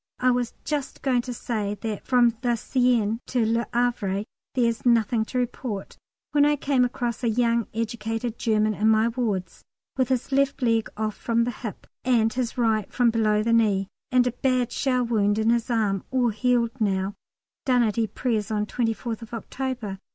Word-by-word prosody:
I 255 Hz, 0 st, +3 dB
was 245 Hz, -1 st, -1 dB
just 290 Hz, -3 st, -3 dB
going 255 Hz, -3 st, +2 dB
to 250 Hz, -, -6 dB
say 215 Hz, -4 st, -3 dB
that 220 Hz, -3 st, -4 dB
from 240 Hz, -2 st, +4 dB
the 240 Hz, -2 st, +1 dB
Seine 235 Hz, -2 st, +1 dB
to 245 Hz, -3 st, +1 dB
Le 230 Hz, 0 st, 0 dB
Havre 235 Hz, -5 st, 0 dB, 0.3 s
there 250 Hz, -2 st, +3 dB
is 230 Hz, -1 st, -1 dB
nothing 230 Hz, -2 st, +3 dB
to 255 Hz, -, -4 dB
report, 240 Hz, -4 st, -3 dB, 0.4 s
when 290 Hz, -1 st, +4 dB
I 295 Hz, 0 st, +4 dB
came 275 Hz, -2 st, +1 dB
across 240 Hz, -1 st, -2 dB
a 235 Hz, -, +2 dB
young 235 Hz, 0 st, +1 dB
educated 225 Hz, +1 st, -3 dB
German 215 Hz, -1 st, +2 dB
in 215 Hz, +2 st, +2 dB
my 220 Hz, +1 st, +4 dB
wards 210 Hz, -7 st, -3 dB, 0.3 s
with 260 Hz, -1 st, +1 dB
his 255 Hz, 0 st, -1 dB
left 275 Hz, 0 st, +1 dB
leg 225 Hz, -2 st, +2 dB
off 215 Hz, 0 st, -1 dB
from 235 Hz, 0 st, +1 dB
the 245 Hz, -, -1 dB
hip, 220 Hz, -2 st, -7 dB, 0.2 s
and 230 Hz, -3 st, +2 dB
his 245 Hz, -1 st, -2 dB
right 220 Hz, -4 st, +1 dB
from 245 Hz, -2 st, +3 dB
below 215 Hz, -2 st, +2 dB
the 230 Hz, +1 st, +1 dB
knee, 200 Hz, -4 st, +2 dB, 0.2 s
and 250 Hz, -1 st, +4 dB
a 250 Hz, -, +1 dB
bad 250 Hz, -1 st, 0 dB
shell 255 Hz, -2 st, +1 dB
wound 210 Hz, -3 st, +1 dB
in 220 Hz, +1 st, +3 dB
his 235 Hz, +1 st, 0 dB
arm, 210 Hz, -5 st, +1 dB
all 255 Hz, -2 st, +2 dB
healed 235 Hz, +1 st, +1 dB
now, 195 Hz, -1 st, 0 dB, 0.5 s
done 250 Hz, -2 st, +4 dB
at 220 Hz, 0 st, 0 dB
Ypres 220 Hz, 0 st, -1 dB
on 210 Hz, -1 st, 0 dB
24th 225 Hz, 0 st, -3 dB
October. 235 Hz, -4 st, -4 dB
230 Hz, 180 wpm, -25 LUFS, 215-250 Hz, 0.5 s, from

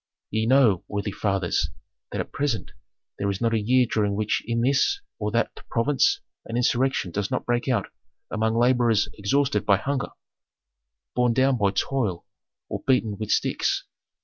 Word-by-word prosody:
"Ye 110 Hz, +1 st, 0 dB
know, 120 Hz, -8 st, +4 dB
worthy 105 Hz, 0 st, -3 dB
fathers, 95 Hz, -3 st, 0 dB, 0.4 s
that -, -, -3 dB
at -, -, -4 dB
present 135 Hz, -9 st, -2 dB, 0.5 s
there 100 Hz, -, 0 dB
is 100 Hz, -1 st, -2 dB
not 115 Hz, -1 st, +1 dB
a 110 Hz, -, +2 dB
year 125 Hz, +4 st, +4 dB
during 105 Hz, -3 st, 0 dB
which 105 Hz, +1 st, 0 dB
in 115 Hz, 0 st, 0 dB
this 140 Hz, -, +2 dB, 0.2 s
or 105 Hz, -1 st, -1 dB
that 115 Hz, +2 st, 0 dB, 0.2 s
province 145 Hz, -, +2 dB, 0.2 s
an 115 Hz, -, -3 dB
insurrection 125 Hz, -5 st, +1 dB
does 100 Hz, +2 st, -2 dB
not 130 Hz, -, -2 dB
break 120 Hz, +1 st, 0 dB
out 115 Hz, -7 st, +1 dB, 0.5 s
among 110 Hz, +1 st, 0 dB
laborers 120 Hz, -3 st, +3 dB
exhausted 140 Hz, +7 st, +1 dB
by 100 Hz, -2 st, +4 dB
hunger, 135 Hz, +5 st, -2 dB, 1.1 s
borne 125 Hz, -1 st, +3 dB
down 130 Hz, +2 st, +3 dB
by 100 Hz, -1 st, +3 dB
toil, 100 Hz, -3 st, -1 dB, 0.4 s
or -, -, -4 dB
beaten 110 Hz, -6 st, +2 dB
with 110 Hz, -1 st, -4 dB
sticks. -, -, +1 dB
115 Hz, 160 wpm, -25 LUFS, 105-130 Hz, 1.1 s, know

